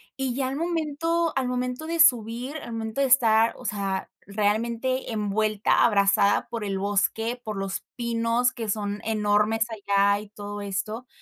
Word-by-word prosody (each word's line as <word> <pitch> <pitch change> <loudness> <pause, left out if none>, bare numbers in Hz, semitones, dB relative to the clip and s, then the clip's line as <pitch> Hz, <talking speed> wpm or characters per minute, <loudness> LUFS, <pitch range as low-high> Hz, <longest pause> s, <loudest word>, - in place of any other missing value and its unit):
Y 265 -3 -2
ya 265 -1 -1
al 270 - -3
momento 330 0 -1
al 260 -2 0
momento 250 +4 -3
de 335 0 -2
subir, 245 -1 +3
al 240 -5 -8
momento 225 +4 -3
de 270 - +3
estar, 230 -3 +4
o 250 - -12
sea, 195 -2 -2 0.2
realmente, 230 +5 -1
envuelta, 215 0 +1
abrazada 200 -1 +3
por 230 -2 -4
el 195 -1 -2
bosque, 225 +4 0
por 215 -2 -5
los 195 0 -3
pinos, 235 +1 +1
que 225 -3 -6
son 205 0 -2
enormes 215 0 +1
allá, 200 -1 +2
y 210 -1 -11
todo 205 0 -7
esto. 215 +5 -4
225 Hz, 160 wpm, -25 LUFS, 205-250 Hz, 0.2 s, estar